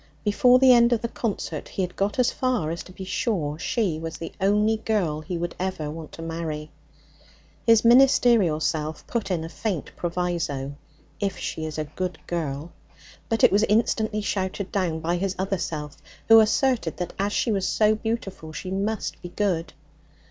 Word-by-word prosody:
Before 245 +4 +5
the 260 0 +7
end 235 0 +5
of 225 - 0
the - - +1
concert 205 -9 -4
he 190 - -2
had 180 0 -4
got 200 +4 -1
as 250 -2 +3
far 245 -12 0
as 170 - -4
to - - -12
be 190 - -8
sure 185 -6 -1
she 195 -7 0
was 165 0 -5
the 165 - -6
only 210 +3 +3
girl 190 -9 -1
he 170 +3 -4
would 175 +1 -3
ever 185 -5 -2
want 160 0 -8
to 165 - -8
marry. 160 -2 -4 1.0
His 230 0 +5
ministerial 235 - +5
self 155 -1 -2
put 235 -4 -3
in 175 -4 -1
a - - -5
faint 180 -2 -3
proviso, 170 -6 -2 0.5
'If 195 -2 -1
she 160 - -4
is 155 - -6
a 155 - 0
good 180 +3 -4
girl'; 155 -1 -3 0.6
but 225 - 0
it - - +8
was 200 +2 +4
instantly 215 0 +1
shouted 195 -1 -2
down 170 -5 -1
by 170 +2 0
his 195 +1 -1
other 190 0 -1
self, 150 -3 -4 0.3
who 225 0 +10
asserted 220 - +2
that 180 -1 -4
as 200 +1 0
she 230 - +1
was 195 -3 0
so 215 0 +3
beautiful 215 -7 -4
she 185 +3 -6
must 205 +3 -2
be 175 - -7
good. 175 -4 -1
185 Hz, 185 wpm, -25 LUFS, 160-215 Hz, 1.0 s, who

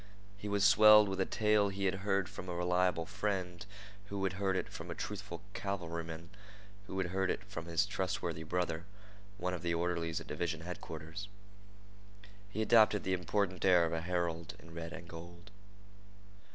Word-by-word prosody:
He 100 +1 -7
was 100 -1 +1
swelled 105 +1 +8
with 95 0 -1
a - - +1
tale 105 -2 +3
he 100 0 -3
had 95 0 +1
heard 100 -2 +1
from 90 - -8
a 90 - -3
reliable 90 -1 +2
friend, 95 -1 -2 0.4
who 100 -1 -4
had 95 0 +1
heard 95 -1 0
it 95 - -1
from - - -8
a - - -4
truthful 100 -3 -5
cavalryman, 85 -3 -4 0.6
who 95 - -5
had 90 -2 -1
heard 95 0 +1
it - - -1
from 90 -5 -7
his 85 +3 +2
trustworthy 90 -4 -2
brother, 85 0 -2 0.5
one 90 -2 -2
of 90 - -4
the 85 -1 0
orderlies 85 -1 -1
at - - -9
division 80 +1 -2
headquarters. 80 +1 -6 1.2
He 110 +2 -1
adopted 110 -2 +5
the 95 - 0
important 95 +1 0
air 90 -3 +6
of 80 - -2
a 80 - -1
herald 85 -1 -2
in 85 0 -14
red 85 0 -6
and 85 -1 -8
gold. 85 +4 -10
90 Hz, 175 wpm, -34 LUFS, 85-100 Hz, 1.2 s, swelled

